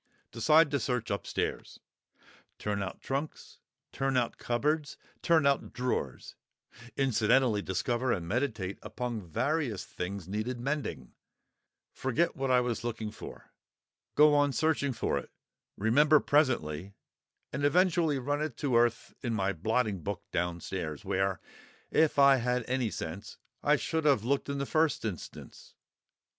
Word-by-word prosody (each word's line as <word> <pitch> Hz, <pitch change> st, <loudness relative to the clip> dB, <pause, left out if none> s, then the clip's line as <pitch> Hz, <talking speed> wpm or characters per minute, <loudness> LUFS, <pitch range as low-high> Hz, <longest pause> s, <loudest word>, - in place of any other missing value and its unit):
Decide 155 Hz, +6 st, +4 dB
to 140 Hz, -, +1 dB
search 125 Hz, -2 st, -2 dB
upstairs; 100 Hz, -, -3 dB, 0.8 s
turn 105 Hz, -1 st, -2 dB
out 95 Hz, -, -5 dB
trunks, 140 Hz, +3 st, -4 dB, 0.3 s
turn 135 Hz, -1 st, 0 dB
out 120 Hz, -2 st, -1 dB
cupboards, 145 Hz, +5 st, -1 dB, 0.2 s
turn 165 Hz, -4 st, +3 dB
out 140 Hz, -1 st, +1 dB
drawers 125 Hz, -, -3 dB, 0.6 s
(incidentally 120 Hz, -3 st, +3 dB
discover 120 Hz, +7 st, -1 dB
and 85 Hz, -6 st, -1 dB
meditate 110 Hz, -4 st, -2 dB
upon 115 Hz, +1 st, -4 dB
various 120 Hz, -, -1 dB
things 90 Hz, 0 st, -5 dB
needing 115 Hz, +5 st, -3 dB
mending); 135 Hz, -, -3 dB, 0.8 s
forget 135 Hz, +7 st, 0 dB
what 135 Hz, -3 st, -2 dB
I 125 Hz, -1 st, +5 dB
was 120 Hz, -2 st, -2 dB
looking 115 Hz, -2 st, -3 dB
for; -, -, -11 dB, 0.6 s
go 150 Hz, 0 st, +7 dB
on 145 Hz, -1 st, +3 dB
searching 150 Hz, -2 st, +1 dB
for 125 Hz, -, -1 dB
it; -, -, -11 dB, 0.5 s
remember 145 Hz, +9 st, +5 dB
presently, 100 Hz, -, +1 dB, 0.6 s
and 140 Hz, +2 st, -2 dB
eventually 165 Hz, -1 st, +3 dB
run 145 Hz, +3 st, -1 dB
it 155 Hz, -6 st, -3 dB
to 135 Hz, -4 st, 0 dB
earth 120 Hz, 0 st, +2 dB
in 120 Hz, -3 st, -1 dB
my 100 Hz, -1 st, 0 dB
blotting 110 Hz, +1 st, 0 dB
book 100 Hz, -1 st, -4 dB
downstairs, 85 Hz, -3 st, -3 dB
where, 95 Hz, -1 st, 0 dB, 0.5 s
if 160 Hz, -2 st, +3 dB
I 140 Hz, -1 st, +7 dB
had 125 Hz, 0 st, 0 dB
had -, -, -13 dB
any 130 Hz, -3 st, +1 dB
sense, 85 Hz, +1 st, -6 dB, 0.2 s
I 150 Hz, -, +4 dB
should 160 Hz, +2 st, -2 dB
have 140 Hz, -8 st, +4 dB
looked 140 Hz, +4 st, 0 dB
in 140 Hz, -, -2 dB
the 140 Hz, -, -1 dB
first 155 Hz, -3 st, +1 dB
instance. 95 Hz, -8 st, -8 dB
125 Hz, 140 wpm, -30 LUFS, 105-145 Hz, 0.8 s, go